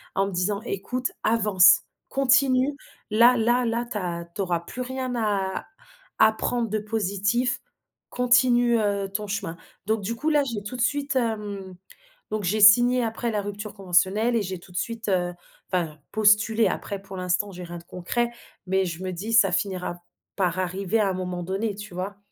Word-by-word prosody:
en 195 0 +2
me - - -5
disant: 195 +3 -1
«Écoute, 245 +5 -3
avance, 210 -4 +5 0.3
continue, 270 +1 +3 0.4
là 235 +3 +6
là 240 +2 +2
là 235 +1 -1
tu - - -2
as 170 -3 -3
tu - - -2
auras 175 -3 0
plus 245 +8 -7
rien 255 0 -3
à 200 -4 -1 0.5
à 220 - +7
prendre 235 +1 -1
de 215 +1 -1
positif, 210 +3 0 0.5
continue, 245 -1 +3
heu, 200 -2 0
ton 210 +1 -3
chemin», 195 -4 -4 0.3
donc 220 +1 0
du 215 +4 -3
coup 300 +7 -1
là, 295 -2 +3
j'ai 230 -6 -4
tout 210 +5 -6
de - - -2
suite, 285 +3 0
hem 205 -5 -3 0.6
donc 215 -1 -2
j'ai 200 +4 0
signé, 245 +4 +7
après, 230 +1 -2
la 210 -1 -1
rupture 205 +1 -6
conventionnelle 195 +5 +2
et 230 - +2
j'ai 185 -2 -4
tout 180 - -17
de - - -5
suite, 230 +2 -3
heu 180 -2 0 0.4
enfin 170 -5 -1
postulé. 215 +1 +4
Après 200 -1 -4
pour 195 -1 -10
l'instant, 185 +3 -1
j'ai 180 0 -8
rien 175 0 -7
de - - -16
concret, 235 +8 -2 0.4
mais 190 +1 +2
je 170 0 -5
me 185 - -3
dis: 200 +6 -5
«Ca 195 - 0
finira 180 -2 -2 0.3
par 185 -2 0
arriver 190 +3 -1
à 210 - +3
un - - -1
moment 180 -1 -4
donné», 195 +4 -2
tu 205 -2 -9
vois? 195 +3 -4
205 Hz, 185 wpm, -25 LUFS, 185-235 Hz, 0.6 s, à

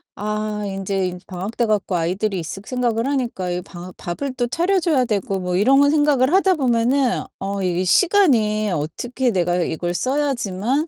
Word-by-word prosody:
아 210 0 -3
인제 195 -1 -2
이 180 - -7
방학 190 +4 -6
돼 240 - +2
갖고 210 -4 0
아이들이 185 +4 -1
있을 170 +4 -6
생각을 240 -1 -1
하니까 240 -10 -2
이 175 0 -2
방하 180 0 -10
밥을 255 +11 -4
또 245 -1 0
차려 350 +9 +1
줘야 305 -7 +2
되고 200 -3 -1
뭐 180 -1 -2
이런 270 +8 +5
생각을 290 -2 +3
하다 380 -1 +4
보면은 250 -1 +1 0.2
어 195 0 -3
이게 180 0 0
시간이 220 - +3
어떻게 240 - -2
내가 175 -3 +1
이걸 175 +2 -2
써야지만 260 - -1
215 Hz, 335 characters per minute, -21 LUFS, 185-265 Hz, 0.2 s, 이런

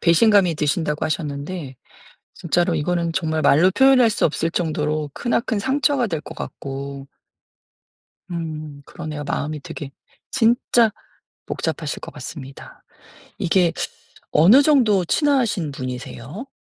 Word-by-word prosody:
배신감이 185 0 +4
드신다고 150 +1 -1
하셨는데 145 -1 -4 0.6
진짜로 175 +1 0
이거는 170 +2 0
정말 160 -3 -1
말로 165 +7 +5
표현할 260 +1 +5
수 215 - 0
없을 165 +2 +1
정도로 155 -3 -1
크나큰 235 -2 -1
상처가 275 +1 +1
될 165 -6 -3
것 - - -10
같고 140 0 -6 1.2
음 155 -4 -6
그러네요. 150 -3 -7
마음이 150 +1 -3
되게 140 0 -8 0.4
진짜 235 -1 +3 0.6
복잡하실 - - -3
것 - - -8
같습니다. 135 -3 -10 0.6
이게 175 -1 +2 0.6
어느 200 - +7
정도 230 - +4
친하신 235 - +1
분이세요? 130 - -7
165 Hz, 270 characters per minute, -21 LUFS, 150-215 Hz, 1.2 s, 어느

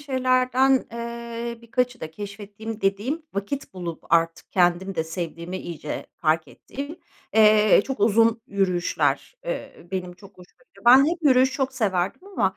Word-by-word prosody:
şeylerden, 260 -1 +2
eee, 235 0 -5
birkaçı 245 +1 -1
da 160 - -6
keşfettiğim 205 +4 -8
dediğim, 210 +12 -1
vakit 200 +5 -4
bulup 175 -3 -6
artık 165 0 +1
kendim 180 +1 +2
de 160 -2 -1
sevdiğimi 170 +2 -5
iyice 155 -3 -6
fark 155 -1 +1
ettiğim, 285 +5 -8 0.4
eee, 215 -2 +6
çok 270 -5 -5
uzun 225 +2 +4
yürüyüşler. 190 - 0
Eee, - - -6
benim 180 -2 -3
çok 195 +2 -15
hoşuma 180 - -18
gidiyor. - - -21
Ben 260 +3 +8
hep 340 +1 -2
yürüyüş 260 -2 +5
çok 270 -1 -1
severdim 200 - -1
ama 190 - 0
215 Hz, 145 wpm, -24 LUFS, 180-255 Hz, 0.4 s, Ben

